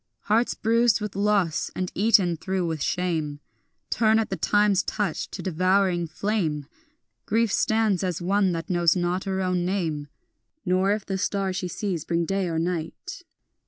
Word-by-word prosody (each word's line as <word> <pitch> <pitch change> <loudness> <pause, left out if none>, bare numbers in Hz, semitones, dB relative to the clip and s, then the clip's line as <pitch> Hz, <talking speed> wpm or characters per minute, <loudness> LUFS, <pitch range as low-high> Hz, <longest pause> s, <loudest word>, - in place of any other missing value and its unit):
Hearts 225 +3 +1
bruised 230 0 +3
with 210 -2 -5
loss 200 -5 +1
and 185 -1 -3
eaten 195 -4 +3
through 185 +2 -2
with 160 -3 -3
shame 160 -5 -1 0.5
Turn 220 -1 +3
at 225 - -1
the - - 0
time's 205 -2 +3
touch 210 -1 -2
to - - -7
devouring 185 0 +1
flame; 165 -6 -2 0.6
Grief 225 0 +2
stands 220 -5 +1
as 180 -3 -1
one 195 +2 +2
that 165 -1 -4
knows 175 -2 +3
not 180 +1 -1
her 190 -1 -1
own 180 -1 0
name, 165 -6 -2 0.6
Nor 185 +2 +2
if 210 -1 -1
the 195 -1 -3
star 195 -1 -1
she 185 -1 -3
sees 180 -4 -3
bring 170 0 0
day 195 +1 -1
or 165 -1 -2
night. 175 - -4
185 Hz, 160 wpm, -25 LUFS, 175-205 Hz, 0.6 s, bruised